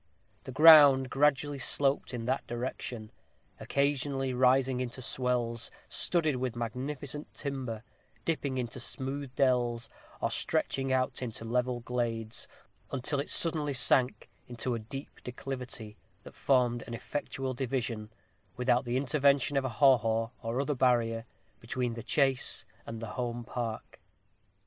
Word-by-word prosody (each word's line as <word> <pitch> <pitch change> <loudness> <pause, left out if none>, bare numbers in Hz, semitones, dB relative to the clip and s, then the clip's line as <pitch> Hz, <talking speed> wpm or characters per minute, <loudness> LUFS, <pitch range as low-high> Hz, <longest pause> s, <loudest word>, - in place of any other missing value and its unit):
The - - -6
ground 145 -3 +8
gradually 145 0 +2
sloped 135 +2 +2
in 120 -3 -4
that 130 +2 -1
direction, 120 -2 -5 0.5
occasionally 140 -1 0
rising 130 0 +3
into 125 0 -4
swells, 120 -2 -1 0.2
studded 155 -6 +2
with 125 -2 -2
magnificent 130 +5 -5
timber 130 -6 -4 0.4
dipping 145 -5 -1
into 125 0 -3
smooth 135 +3 -4
dells, 120 -3 +1 0.3
or - - -1
stretching 135 -1 0
out 130 0 0
into 120 -1 -5
level 125 +1 0
glades, 115 -2 -3 0.4
until 140 +2 -2
it 140 - -3
suddenly 155 -4 +2
sank 130 0 +3 0.2
into 125 +1 -3
a 115 - -2
deep 135 +6 -9
declivity, 125 -4 -6 0.3
that - - -12
formed 125 -3 +1
an 120 - -5
effectual 135 +1 -4
division, 120 -4 -3 0.5
without 125 +1 +2
the 120 +1 0
intervention 140 +1 +2
of 135 -1 +1
a - - 0
haw 135 +2 +5
haw, 115 +1 -1
or 115 +1 -2
other 140 +2 0
barrier, 120 -3 +1 0.3
between 125 0 -2
the 115 - -6
chase 135 +3 +1 0.2
and 115 0 -6
the 115 +3 -4
home 120 0 -3
park. 115 -2 -5
125 Hz, 135 wpm, -30 LUFS, 120-135 Hz, 0.5 s, ground